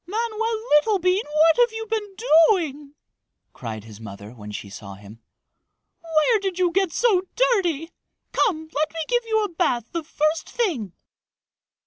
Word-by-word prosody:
"Manoel 450 Hz, +2 st, -1 dB, 0.2 s
Littlebean, 370 Hz, +1 st, +1 dB
what 315 Hz, +2 st, +4 dB
have 485 Hz, -1 st, +4 dB
you 445 Hz, 0 st, -5 dB
been 420 Hz, -3 st, -3 dB, 0.3 s
doing?" 300 Hz, -7 st, -1 dB, 0.6 s
cried 110 Hz, -4 st, -7 dB
his 110 Hz, -1 st, -13 dB
mother 100 Hz, 0 st, -9 dB
when 105 Hz, -4 st, -11 dB
she 105 Hz, -, -6 dB
saw 100 Hz, 0 st, -9 dB
him. 105 Hz, +3 st, -14 dB, 0.8 s
"Where 330 Hz, +7 st, +2 dB
did 385 Hz, -2 st, -3 dB
you 360 Hz, -2 st, +2 dB
get 380 Hz, -1 st, +1 dB
so 425 Hz, -4 st, +3 dB
dirty? 350 Hz, -, +1 dB, 0.4 s
Come, 320 Hz, -8 st, 0 dB
let 305 Hz, +2 st, 0 dB
me 330 Hz, -, -5 dB
give 485 Hz, -1 st, +1 dB
you 440 Hz, -1 st, +2 dB
a 415 Hz, -, -2 dB
bath 245 Hz, -9 st, -1 dB
the 335 Hz, -1 st, -3 dB
first 310 Hz, +1 st, -1 dB
thing!" 295 Hz, -, -2 dB
335 Hz, 150 wpm, -23 LUFS, -, 0.8 s, what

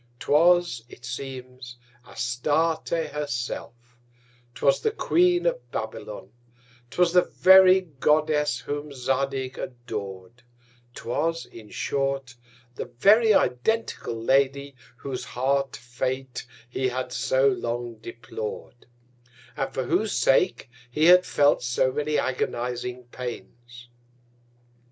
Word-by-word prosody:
'Twas, 170 Hz, -1 st, +3 dB
it -, -, -13 dB
seems 130 Hz, -2 st, -7 dB, 0.3 s
Astarte 145 Hz, +7 st, -1 dB, 0.2 s
her 150 Hz, 0 st, -3 dB
self; 120 Hz, -1 st, -6 dB, 0.6 s
'twas 140 Hz, -, +2 dB
the -, -, +2 dB
Queen 355 Hz, -4 st, +2 dB
of -, -, -1 dB
Babylon; -, -, -6 dB, 0.6 s
'twas 175 Hz, +5 st, +2 dB
the 180 Hz, -, +7 dB
very 190 Hz, +1 st, +6 dB
Goddess 150 Hz, -1 st, +1 dB
whom 145 Hz, +1 st, -5 dB
Zadig 135 Hz, 0 st, -2 dB
ador'd; 105 Hz, -4 st, -7 dB, 0.5 s
'twas, 165 Hz, +7 st, -2 dB
in 110 Hz, -2 st, -13 dB
short, 135 Hz, -2 st, -2 dB, 0.4 s
the -, -, -5 dB
very 205 Hz, -, +4 dB
identical 125 Hz, -, 0 dB
Lady, 135 Hz, +4 st, +1 dB, 0.2 s
whose 130 Hz, -1 st, -5 dB
hard 135 Hz, +1 st, -1 dB
Fate 130 Hz, +1 st, -4 dB, 0.2 s
he 130 Hz, +2 st, -1 dB
had 125 Hz, 0 st, -4 dB
so 130 Hz, +1 st, +2 dB
long 120 Hz, -2 st, -3 dB
deplor'd; 115 Hz, +1 st, -8 dB, 0.7 s
and 135 Hz, -2 st, -2 dB
for 130 Hz, -, -2 dB
whose 180 Hz, -, 0 dB
sake 180 Hz, +7 st, +2 dB, 0.2 s
he 150 Hz, +6 st, +1 dB
had 180 Hz, +1 st, +7 dB
felt 145 Hz, 0 st, +3 dB
so 125 Hz, +1 st, +1 dB
many 150 Hz, +2 st, -1 dB
agonizing 125 Hz, 0 st, -2 dB
Pains. 125 Hz, 0 st, -9 dB
135 Hz, 105 wpm, -25 LUFS, 125-155 Hz, 0.7 s, the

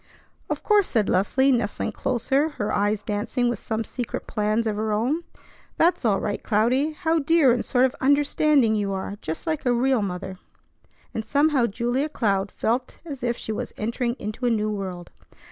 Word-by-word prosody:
"Of -, -, -3 dB
course!" 415 Hz, -3 st, +4 dB
said 220 Hz, -4 st, +1 dB
Leslie, 265 Hz, +9 st, +3 dB
nestling 230 Hz, -5 st, -1 dB
closer, 270 Hz, +5 st, 0 dB
her 205 Hz, -, -1 dB
eyes 205 Hz, +1 st, +1 dB
dancing 215 Hz, +4 st, -1 dB
with 240 Hz, -4 st, -2 dB
some 220 Hz, 0 st, -2 dB
secret 240 Hz, +2 st, -5 dB
plans 215 Hz, +2 st, 0 dB
of 215 Hz, -2 st, 0 dB
her 215 Hz, +1 st, -1 dB
own. 250 Hz, +11 st, 0 dB, 0.5 s
"That's 345 Hz, +2 st, +3 dB
all 200 Hz, -3 st, +3 dB
right, 205 Hz, -, -3 dB
Cloudy. 250 Hz, +8 st, +1 dB
How 325 Hz, +1 st, +1 dB
dear 310 Hz, -2 st, +4 dB
and 240 Hz, -, +1 dB
sort 255 Hz, -1 st, +3 dB
of 260 Hz, -, 0 dB
'understanding' 285 Hz, -3 st, +3 dB
you 205 Hz, -2 st, -1 dB
are, 195 Hz, +1 st, -4 dB
just 160 Hz, -, -5 dB
like 315 Hz, -2 st, -2 dB
a 250 Hz, -, +2 dB
real 255 Hz, 0 st, +2 dB
mother." 190 Hz, -1 st, -5 dB, 0.7 s
And 220 Hz, -, -3 dB
somehow 280 Hz, +1 st, +2 dB
Julia 245 Hz, +7 st, -1 dB
Cloud 200 Hz, -7 st, 0 dB
felt 245 Hz, +3 st, -1 dB
as 280 Hz, -5 st, -7 dB
if 240 Hz, 0 st, -1 dB
she -, -, -5 dB
was 215 Hz, -, -4 dB
entering 235 Hz, +2 st, -1 dB
into 215 Hz, +4 st, -3 dB
a -, -, +4 dB
new 215 Hz, -2 st, 0 dB
world. 185 Hz, -4 st, -5 dB
235 Hz, 180 wpm, -24 LUFS, 210-270 Hz, 0.7 s, course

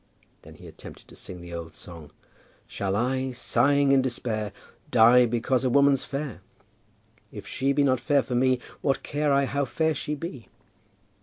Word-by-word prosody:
Then -, -, -14 dB
he -, -, -15 dB
attempted -, -, -13 dB
to -, -, -14 dB
sing 90 Hz, -1 st, -9 dB
the 85 Hz, 0 st, -10 dB
old 80 Hz, -2 st, -7 dB
song 80 Hz, -4 st, -11 dB, 0.6 s
"Shall 100 Hz, -1 st, -3 dB
I, 130 Hz, +3 st, -1 dB
sighing 140 Hz, +3 st, +2 dB
in 135 Hz, -1 st, +5 dB
despair, 115 Hz, -5 st, -3 dB, 0.4 s
die 120 Hz, +1 st, +6 dB
because 120 Hz, +3 st, 0 dB
a 130 Hz, -, +1 dB
woman's 140 Hz, +1 st, +4 dB
fair? 140 Hz, -8 st, -5 dB, 0.9 s
If 105 Hz, -, -9 dB
she 135 Hz, +2 st, -1 dB
be 145 Hz, +1 st, +2 dB
not 130 Hz, -3 st, +2 dB
fair 140 Hz, +2 st, +2 dB
for 125 Hz, -, -6 dB
me, 130 Hz, +1 st, +2 dB, 0.2 s
what 135 Hz, -, 0 dB
care 145 Hz, 0 st, -1 dB
I 140 Hz, 0 st, +3 dB
how 140 Hz, +1 st, -1 dB
fair 160 Hz, +4 st, 0 dB
she 150 Hz, +1 st, -4 dB
be?" 140 Hz, -6 st, -8 dB
130 Hz, 170 wpm, -26 LUFS, 115-140 Hz, 0.9 s, die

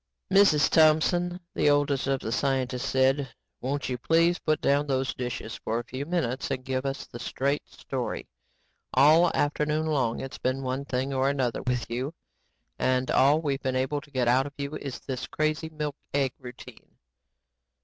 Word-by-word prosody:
"Mrs. 175 Hz, -8 st, +6 dB
Thompson," 170 Hz, +3 st, +3 dB
the -, -, +3 dB
oldest 145 Hz, -2 st, +2 dB
of 135 Hz, -1 st, 0 dB
the 110 Hz, -, -4 dB
scientists 130 Hz, 0 st, 0 dB
said, 135 Hz, +1 st, +2 dB, 0.3 s
"won't 140 Hz, +2 st, -2 dB
you 125 Hz, -1 st, -3 dB
please 165 Hz, +5 st, +3 dB
put 155 Hz, -1 st, 0 dB
down 145 Hz, +1 st, +2 dB
those 135 Hz, -1 st, 0 dB
dishes 120 Hz, -2 st, -5 dB
for 115 Hz, 0 st, -2 dB
a 120 Hz, -, -2 dB
few 130 Hz, +4 st, -6 dB
minutes 135 Hz, -7 st, -1 dB
and 130 Hz, -, -3 dB
give 130 Hz, 0 st, -1 dB
us 135 Hz, -, -4 dB
the 120 Hz, -, -10 dB
straight 140 Hz, +4 st, -2 dB
story. -, -, -5 dB, 0.7 s
All 155 Hz, +6 st, +6 dB
afternoon 150 Hz, +1 st, 0 dB
long 135 Hz, -7 st, 0 dB
its 135 Hz, -, -7 dB
been 130 Hz, +1 st, -1 dB
one 130 Hz, +2 st, -2 dB
thing 135 Hz, +1 st, -2 dB
or 135 Hz, +1 st, +2 dB
another 130 Hz, -5 st, -1 dB
with 125 Hz, -1 st, -1 dB
you 130 Hz, +7 st, -3 dB, 0.6 s
and 130 Hz, 0 st, +1 dB
all 145 Hz, +4 st, +4 dB
we've 140 Hz, -2 st, -1 dB
been 130 Hz, -1 st, -1 dB
able 135 Hz, +3 st, 0 dB
to 145 Hz, -, -17 dB
get 130 Hz, -3 st, 0 dB
out 130 Hz, +3 st, +3 dB
of 145 Hz, -, -10 dB
you 140 Hz, +1 st, -4 dB
is 140 Hz, -3 st, -6 dB
this 130 Hz, -1 st, -5 dB
crazy 155 Hz, +1 st, -1 dB
milk 150 Hz, -2 st, -4 dB, 0.2 s
egg 135 Hz, -2 st, +1 dB
routine." 125 Hz, -1 st, -12 dB
135 Hz, 175 wpm, -27 LUFS, 130-150 Hz, 0.7 s, Mrs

